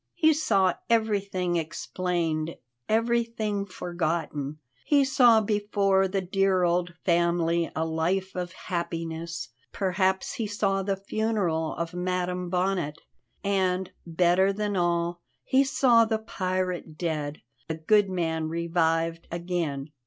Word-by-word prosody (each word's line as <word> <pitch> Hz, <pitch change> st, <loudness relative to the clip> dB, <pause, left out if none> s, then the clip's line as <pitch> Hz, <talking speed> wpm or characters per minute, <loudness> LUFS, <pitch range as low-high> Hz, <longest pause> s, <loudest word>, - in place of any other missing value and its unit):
He 315 Hz, -2 st, +5 dB
saw 195 Hz, -, +2 dB, 0.2 s
everything 200 Hz, -6 st, +1 dB
explained, 165 Hz, -1 st, -2 dB, 0.3 s
everything 225 Hz, -3 st, 0 dB
forgotten. 160 Hz, -5 st, -3 dB, 0.3 s
He 285 Hz, -2 st, +4 dB
saw 245 Hz, -5 st, +5 dB
before 200 Hz, -2 st, +2 dB
the 195 Hz, +1 st, -1 dB
dear 190 Hz, 0 st, +2 dB
old 175 Hz, 0 st, +1 dB
family 170 Hz, -1 st, +2 dB
a 160 Hz, -, 0 dB
life 175 Hz, +4 st, -1 dB
of 180 Hz, -1 st, -4 dB
happiness 170 Hz, -3 st, -4 dB, 0.2 s
perhaps 190 Hz, 0 st, 0 dB
he 225 Hz, -, -2 dB
saw 200 Hz, -2 st, 0 dB
the 195 Hz, 0 st, 0 dB
funeral 195 Hz, -6 st, -1 dB
of 170 Hz, +1 st, -4 dB
Madam 180 Hz, 0 st, -2 dB
Bonnet 180 Hz, -4 st, 0 dB, 0.5 s
and, 190 Hz, -2 st, 0 dB, 0.2 s
better 180 Hz, +3 st, +3 dB
than 205 Hz, 0 st, -2 dB
all, 175 Hz, -1 st, 0 dB, 0.2 s
he 265 Hz, -, +3 dB
saw 250 Hz, -3 st, +4 dB
the 220 Hz, 0 st, 0 dB
pirate 185 Hz, -6 st, -3 dB
dead, 155 Hz, -3 st, -3 dB, 0.2 s
the 160 Hz, -, -2 dB
good 200 Hz, +5 st, +3 dB
man 160 Hz, -3 st, -1 dB
revived 165 Hz, 0 st, 0 dB
again. 170 Hz, -5 st, -3 dB
180 Hz, 115 wpm, -27 LUFS, 170-200 Hz, 0.5 s, He